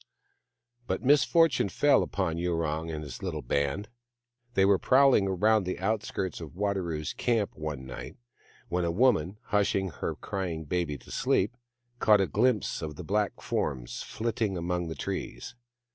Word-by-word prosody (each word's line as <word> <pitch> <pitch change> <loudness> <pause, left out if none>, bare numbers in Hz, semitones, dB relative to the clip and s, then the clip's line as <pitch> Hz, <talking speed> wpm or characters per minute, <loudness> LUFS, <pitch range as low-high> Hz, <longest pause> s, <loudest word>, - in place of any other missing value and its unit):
But - - -2
misfortune 145 -2 +4
fell 145 +9 +4
upon 85 -4 -1
Yurong 80 -2 -1
and 75 -1 -4
his 70 - -8
little - - -3
band. 70 +9 -1 0.7
They 95 - +5
were 100 -1 +4
prowling 130 -7 +5
round 105 +3 +3
the 90 - -2
outskirts 95 -3 -2
of 80 0 -9
Wadaro's 90 -6 -2
camp 115 -4 0
one 75 -4 -5
night 65 -1 -8 0.5
when 90 0 -1
a 85 - +1
woman, 100 -2 +2
hush 105 -1 +2
ing 95 -1 0
her 75 - -4
crying 90 -5 -4
baby 80 -2 -2
to - - -15
sleep, 105 +5 +1 0.4
caught 105 -1 +5
a 95 - +3
glimpse 110 0 +1
of 75 -2 -5
the 90 - -7
black 105 +4 -1
forms - - -2
flitting 110 -4 -2
among 90 0 -2
the 80 - -5
trees. 120 - -5
95 Hz, 155 wpm, -29 LUFS, 80-105 Hz, 0.7 s, They